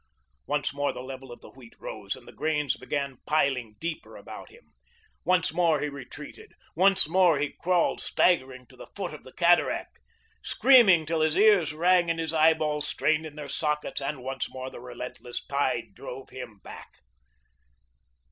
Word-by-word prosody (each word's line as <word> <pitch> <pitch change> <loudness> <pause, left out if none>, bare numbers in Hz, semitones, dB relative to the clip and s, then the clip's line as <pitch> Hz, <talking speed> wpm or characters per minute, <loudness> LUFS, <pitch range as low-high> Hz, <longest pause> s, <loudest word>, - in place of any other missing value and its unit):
Once 145 -1 -1
more 145 0 0
the 125 - -8
level 130 -1 -9
of 120 - -11
the - - -13
wheat 125 -3 -16
rose 100 -2 -5
and 125 - -16
the - - -10
grains 150 -3 0
began 140 -3 -4
piling 130 -8 +1
deeper 165 0 -5
about - - -10
him. 475 - -20 0.5
Once 180 -3 +2
more 165 -3 +2
he 150 - -2
retreated. 140 +1 -11 0.2
Once 195 0 +5
more 175 -2 +4
he 145 0 -2
crawled 180 -1 +1
staggering 130 -7 +1
to - - -19
the - - -12
foot - - -4
of - - -10
the - - -13
cataract, - - +2 0.4
screaming 220 -11 +6
till 160 +1 -1
his 155 0 +2
ears 205 -3 +5
sang 175 +3 +3
and 165 0 0
his 160 -1 -2
eyeballs 155 -2 +2
strained 155 +1 0
in 150 - -12
their 150 -2 -7
sockets, 150 +1 -2
and 140 -1 -4
once 135 0 -3
more 130 0 -7
the - - -10
relentless 125 0 -7
tide - - -1
drove 130 +1 -9
him 115 -5 -9
back. - - -11
150 Hz, 170 wpm, -27 LUFS, 130-165 Hz, 0.5 s, screaming